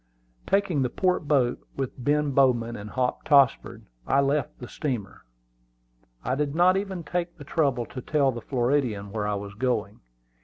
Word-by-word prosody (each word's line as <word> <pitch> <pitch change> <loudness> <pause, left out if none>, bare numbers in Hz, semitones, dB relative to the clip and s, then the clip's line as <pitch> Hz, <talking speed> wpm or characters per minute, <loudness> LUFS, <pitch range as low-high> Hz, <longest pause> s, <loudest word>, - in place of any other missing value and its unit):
Taking 195 -7 +1
the 125 - +1
port 180 0 0
boat, 130 -5 +2 0.2
with 135 -2 -2
Ben 145 +1 +2
Bowman 125 -4 +2
and 105 -1 -8
Hop 125 +2 -1
Tossford, 140 -3 +3 0.2
I 135 - +3
left 140 0 0
the 125 - -9
steamer. 125 - -5 1.0
I 125 - 0
did 145 +1 -1
not 180 +2 +5
even 195 -3 -3
take 175 +1 -3
the 145 - -10
trouble 140 -5 0
to 130 - -8
tell 140 0 +2
the 120 -1 -7
Floridian 120 -6 -1
where 105 -1 -2
I 105 - 0
was 100 0 -6
going. 110 -2 -2
135 Hz, 165 wpm, -26 LUFS, 120-150 Hz, 1.0 s, not